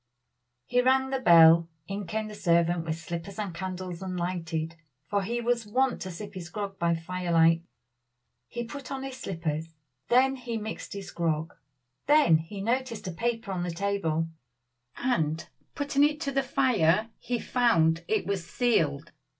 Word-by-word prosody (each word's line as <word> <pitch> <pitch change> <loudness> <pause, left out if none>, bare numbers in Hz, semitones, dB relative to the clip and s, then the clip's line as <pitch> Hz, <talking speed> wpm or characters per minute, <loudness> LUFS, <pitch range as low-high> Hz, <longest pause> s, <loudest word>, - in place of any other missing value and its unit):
He 245 - +2
rang 265 +1 +3
the 265 - 0
bell. 170 -5 +7 0.2
In 195 -1 -4
came 215 +4 -2
the 215 - -8
servant 170 -3 +2
with 160 -1 -1
slippers 170 +3 -6
and 205 -5 -3
candles 185 0 -5
unlighted, 175 -3 -3 0.3
for 200 0 +1
he 235 +5 -2
was 235 -2 0
wont 260 +4 +1
to 190 - -4
sip 195 +4 -8
his 175 -3 -7
grog 195 0 -5
by 170 0 +2
fire 175 +2 -4
light. 165 0 +5 0.9
He 240 - -4
put 280 +3 -8
on 270 -1 -4
his 270 -1 -6
slippers. 165 -5 -4 0.3
Then 265 +2 +4
he 240 -2 -4
mixed 220 +1 -6
his 200 -1 -7
grog. 160 -1 -1 0.5
Then 290 - +6
he 195 +5 -7
noticed 230 -1 -1
a - - -2
paper 225 +3 -2
on 185 -2 -2
the 175 - -2
table, 170 -3 -1 0.7
and 160 -11 0 0.3
putting 285 -1 +2
it 300 +1 +2
to 280 -4 -1
the 275 0 +2
fire 225 -7 +2
he 245 - -2
found 165 -11 +2
it 215 -1 +1
was 195 -3 -1
sealed. 165 - +1
195 Hz, 165 wpm, -28 LUFS, 170-240 Hz, 0.9 s, bell